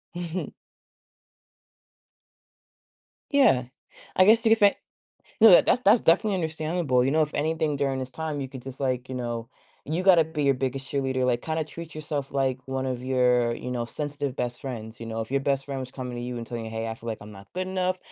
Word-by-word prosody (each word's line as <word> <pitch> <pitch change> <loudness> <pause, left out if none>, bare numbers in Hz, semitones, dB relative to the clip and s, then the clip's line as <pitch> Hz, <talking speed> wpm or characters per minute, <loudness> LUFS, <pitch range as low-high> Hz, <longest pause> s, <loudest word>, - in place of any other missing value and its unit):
Mhm. 175 +1 -4 2.8
Yeah. 135 - +5 0.5
I 185 - +6
guess 225 +3 +5
you 225 - +5
could 225 - +5
say 205 -1 +5 0.6
no, 225 - +9
that 180 - +7
that's 250 - +3
that's 215 +4 +6
definitely 195 +4 +3
understandable, 160 -5 0
you 135 - +2
know, 155 +1 +3
if 150 - -3
anything 155 -1 0
during 135 -1 0
this 130 0 -5
time, 155 +1 -4
you 135 - -4
could 130 -1 -9
just, 135 +1 -9
like, 130 -2 -1
you 130 - -5
know, 120 -2 -4 0.4
you 160 +5 -1
gotta 180 -4 +6
be 155 -2 -3
your 140 - +4
biggest 135 +1 -3
cheerleader, 130 -2 0
like, 120 -1 +1
kinda 160 0 -1
treat 165 0 -9
yourself 150 -3 -4
like 135 -2 0
one 130 0 -2
of 125 -1 -3
your, 125 -2 +2
you 125 - -6
know, 120 -1 -2
sensitive 145 +1 -4
best 120 -1 -3
friends, 110 -4 -7
you - - -5
know? 115 0 -4
If 110 - -5
your 140 0 +1
best 135 -1 0
friend 135 -2 -4
was 130 -1 -6
coming 125 -2 -6
to 120 - -4
you 125 0 -4
and 115 - -6
telling 115 -1 -5
you, 110 - -6
"Hey, 110 0 -3
I 110 - -3
feel 115 +1 -9
like 110 - -3
I'm 105 +1 -11
not 100 -1 -14
good 185 +1 -3
enough. 185 0 -1
135 Hz, 220 wpm, -26 LUFS, 125-160 Hz, 2.8 s, no